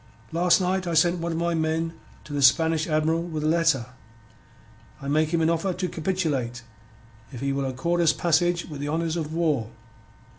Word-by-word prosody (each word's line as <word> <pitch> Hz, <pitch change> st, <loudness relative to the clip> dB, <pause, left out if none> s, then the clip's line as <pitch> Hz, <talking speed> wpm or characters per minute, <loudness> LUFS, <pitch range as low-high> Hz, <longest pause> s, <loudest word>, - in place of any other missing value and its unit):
"Last 170 Hz, +2 st, +3 dB
night 185 Hz, 0 st, -1 dB
I 170 Hz, -, -1 dB
send 170 Hz, +2 st, +3 dB
one 170 Hz, 0 st, -2 dB
of -, -, -3 dB
my 170 Hz, 0 st, 0 dB
men 160 Hz, 0 st, -1 dB, 0.3 s
to 150 Hz, -, -10 dB
the 145 Hz, -, -1 dB
Spanish 160 Hz, +3 st, +4 dB
Admiral 160 Hz, +1 st, +1 dB
with 160 Hz, -3 st, -4 dB
a -, -, +1 dB
letter. 165 Hz, -6 st, +2 dB, 1.1 s
I 140 Hz, -, -7 dB
make 155 Hz, +2 st, +2 dB
him 165 Hz, -2 st, +2 dB
offer 170 Hz, +3 st, 0 dB
to 185 Hz, +1 st, -2 dB
capitulate 155 Hz, -10 st, -2 dB, 0.7 s
if 125 Hz, -, -8 dB
he 140 Hz, 0 st, -1 dB
will 140 Hz, 0 st, -1 dB
accord 150 Hz, +7 st, -1 dB
us 165 Hz, -2 st, +5 dB
passage 175 Hz, +2 st, +1 dB
with 150 Hz, -3 st, -8 dB
the 145 Hz, -, -3 dB
honours 165 Hz, +1 st, -1 dB
of 155 Hz, -3 st, -3 dB
war. 155 Hz, -9 st, 0 dB
160 Hz, 185 wpm, -25 LUFS, 150-170 Hz, 1.1 s, us